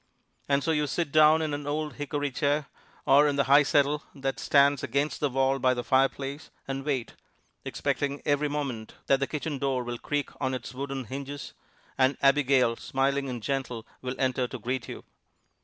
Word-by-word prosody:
And 140 0 +2
so 165 - +1
you 150 -2 +1
sit 165 +1 -2
down 155 +1 +6
in 155 -2 -2
an 145 0 -4
old 150 0 -2
hickory 145 0 -2
chair, 145 +3 0 0.4
or 145 +2 +6
in 145 - 0
the 140 - +3
high 140 +2 +6
settle 145 +1 +2
that 135 -1 -3
stands 140 -1 +4
against 140 +2 -1
the 145 - +1
wall 135 +1 +1
by 130 0 +3
the 120 - -3
fireplace, 135 +3 0 0.2
and 135 0 -3
wait, 135 -5 -2 0.5
expecting 140 0 -2
every 145 0 +2
moment 135 -7 -4
that 135 - +3
the 140 - 0
kitchen 150 -2 -4
door 130 -2 0
will 120 -1 -5
creak 145 -1 -2
on 130 -1 0
its 130 +1 -7
wooden 135 0 -4
hinges, 140 +4 -7 0.5
and 130 +1 +3
Abigail, 135 -4 +3
smiling 135 0 -1
and 120 -3 -5
gentle, 130 -4 -3 0.2
will 125 0 -4
enter 130 -1 0
to 130 - -6
greet 125 +2 -3
you. - - -7
140 Hz, 185 wpm, -27 LUFS, 130-145 Hz, 0.5 s, down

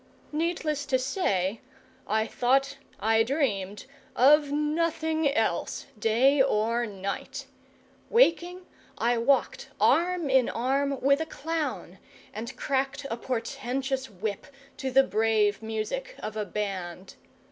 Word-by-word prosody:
Needless 305 -2 -1
to 260 -2 +3
say, 230 - -1 0.5
I 220 +1 +1
thought, 270 +4 +1 0.2
I 225 +1 +3
dreamed 215 -7 -1 0.3
of 290 +3 +5
nothing 315 0 0
else, 220 -9 -1
day 255 +6 +4
or 235 -1 +1
night. 200 -1 -5 0.6
Waking, 360 -5 +3 0.3
I 240 0 +1
walked 270 +4 +1
arm 350 -1 +3
in 265 -2 +3
arm 275 +3 0
with 280 +3 +3
a 320 - -3
clown, 320 0 -4 0.3
and 235 +4 -6
cracked 275 +1 -1
a 230 - -2
portentous 265 +2 -3
whip 205 +1 -5 0.3
to 265 - -3
the 270 +1 +5
brave 215 -3 +1
music 225 - -4
of 215 0 -6
a 215 -1 -2
band. 185 -2 -5
265 Hz, 115 wpm, -27 LUFS, 220-290 Hz, 0.6 s, of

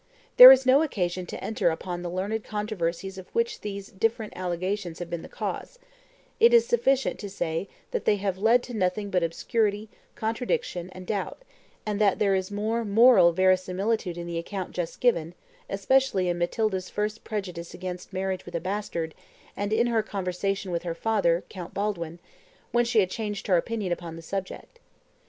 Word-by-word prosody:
There 250 +1 +14
is 265 0 +6
no 260 +3 +6
occasion 185 - -2
to - - -7
enter 215 -5 +1
upon 175 +2 -4
the 175 - -4
learned 200 +5 -2
controversies 195 -3 -3
of 185 - -12
which 465 +1 0
these 200 -1 -6
different 220 +2 -1
allegations 180 0 -3
have 175 -1 -7
been 170 -1 -3
the - - -11
cause; - - -5 0.6
it 470 +1 +7
is 465 - +6
sufficient 275 - +1
to 205 - -6
say 165 -1 -3 0.2
that 480 - -2
they 210 - +4
have 195 -2 -2
led 230 +4 +4
to 245 - -8
nothing 200 0 -1
but 180 - +2
obscurity, 210 +5 -1 0.3
contradiction, 225 - -2
and 185 0 -10
doubt, 205 - -3 0.4
and 210 -1 -2
that 200 -3 +4
there 200 -2 +2
is 190 -1 -1
more 215 +3 -1
moral 225 -3 +6
verisimilitude 185 +2 +1
in 170 - -5
the 170 -1 -3
account 185 +2 -5
just 175 -2 -5
given, 170 -9 +1 0.3
especially 200 -1 +2
in 175 0 -1
Matilda's 190 +1 -1
first 210 +1 -3
prejudice 180 -6 -5
against 180 0 -6
marriage 190 -1 -2
with - - -9
a - - 0
bastard, 175 -3 -3 0.4
and 205 +1 -3
in 225 +2 +3
her 230 -2 +2
conversation 195 -1 -3
with 170 -1 -1
her 170 -1 -4
father, 180 -4 +1
Count 180 -3 -9
Baldwin, 175 -5 -2 0.5
when 240 0 +3
she 230 -2 +3
had 185 -1 -1
changed 210 -2 -4
her 190 - +3
opinion 205 +1 -2
upon 170 -1 -4
the 165 - -10
subject. 195 - -6
195 Hz, 180 wpm, -26 LUFS, 180-220 Hz, 0.6 s, There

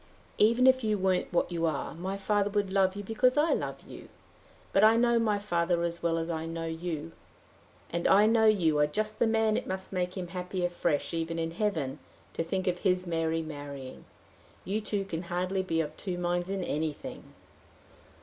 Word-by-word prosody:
"Even 230 +4 +5
if 260 -1 +5
you 215 -1 +1
weren't 185 -1 0
what 175 - +1
you 170 -1 0
are, 155 -3 -2
my 185 +4 -4
father 205 +1 +1
would 205 -2 -1
love 190 -1 +3
you 205 - -5
because 250 +6 +2
I 305 +3 +4
love - - -3
you. - - -11 0.6
But 195 - +4
I 220 +1 +7
know 235 0 +4
my 215 -3 +2
father 175 -4 0
as 170 0 -3
well 165 -1 +1
as 165 0 -2
I 165 -1 -3
know 165 0 -4
you; 165 -1 -4 0.8
and 170 0 0
I 205 +2 +6
know 220 0 +4
you 165 -8 +3
are 150 - +4
just 215 +7 -2
the 235 - +4
man 220 -1 +2
it - - -2
must 190 +1 -5
make 180 0 -2
him 180 -2 -4
happy 180 0 -3
afresh, 170 -4 -1
even 165 0 -2
in 165 0 -2
heaven, 165 -8 -2 0.3
to - - -2
think 185 +3 -2
of 180 -2 0
his 185 -2 +1
Mary 165 -1 -1
marrying. 145 -4 -8 0.6
You 210 +3 -1
two 205 -2 -2
can 165 -4 -4
hardly 180 +2 -1
be 165 -3 0
of 155 -1 -5
two 185 -3 -4
minds 175 +1 -1
in 195 -1 -2
anything!" 155 -2 -4
180 Hz, 200 wpm, -29 LUFS, 165-205 Hz, 0.8 s, I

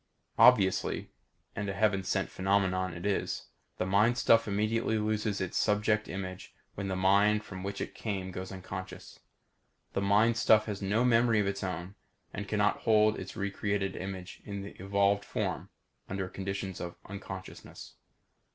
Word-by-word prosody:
Obviously, 100 -7 +4 0.4
and 100 0 -3
a - - -2
heaven 100 -2 +2
sent 90 - -1
phenomenon 95 -1 +1
it 85 +3 -7
is 100 -1 -1 0.3
the - - -1
mind 105 +6 +3
stuff 115 -2 +4
immediately 110 +2 0
loses 105 -1 -1
its 95 -2 -2
subject 105 0 +2
image 95 -1 -6 0.2
when 100 -1 -4
the 95 - -2
mind 100 +3 +3
from 95 -2 -8
which 100 +1 -4
it - - -4
came 95 -4 -4
goes 95 +1 -6
unconscious. 95 0 -8 0.7
The - - 0
mind 105 +4 +3
stuff 110 -2 +5
has 105 -2 -4
no 105 +5 +1
memory 115 -2 +4
of 105 - +2
its 100 0 -2
own 90 0 -4 0.4
and 100 0 -5
cannot 105 0 +2
hold 110 -1 +3
its - - -8
recreated 100 -1 -2
image 95 -1 -6
in 100 -1 -5
the 100 - -8
evolved 100 +1 +2
form - - -3 0.4
under 95 0 -2
conditions 95 -1 -5
of 85 -1 -5
unconsciousness. 95 -1 -9
100 Hz, 155 wpm, -30 LUFS, 95-105 Hz, 0.7 s, stuff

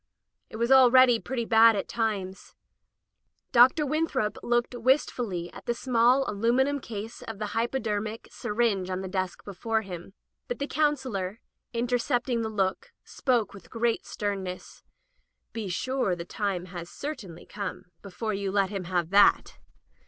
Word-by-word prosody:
It - - -10
was 235 +3 0
already 255 -2 +7
pretty 240 -1 -3
bad 225 0 +6
at 200 - -2
times. 200 -5 -3 1.0
Dr. 255 +6 +6
Winthrop 285 -7 -1
looked 240 +1 0
wistfully 235 - 0
at - - -12
the 240 - 0
small 250 +2 +3
alum 230 +4 +1
inum 280 +1 +1
case 220 0 -7
of 225 -2 -7
the 210 - -3
hypodermic 225 -2 -2
syringe 210 -4 0
on 185 0 -2
the 190 - -5
desk 185 -1 -3
before 220 +3 -2
him. 185 0 -9 0.3
But - - -3
the 280 - -2
Counselor, 260 -11 -1 0.3
inter 245 +1 0
cepting 245 -1 0
the 220 - -2
look, 210 - -2
spoke 240 -6 0
with 200 -3 -13
great 230 0 -1
sternness: 195 -3 -5 0.4
" - - -48
Be 220 -4 -4
sure 255 0 -1
the 170 -1 -7
time 190 -2 -2
has 175 -1 -6
certainly 205 - -7
come 205 -1 -6 0.2
before 210 +3 -4
you 195 -1 -2
let 195 -1 +1
him 195 -3 -4
have 175 -1 -1
that." 200 +1 +4
225 Hz, 150 wpm, -27 LUFS, 195-245 Hz, 1.0 s, already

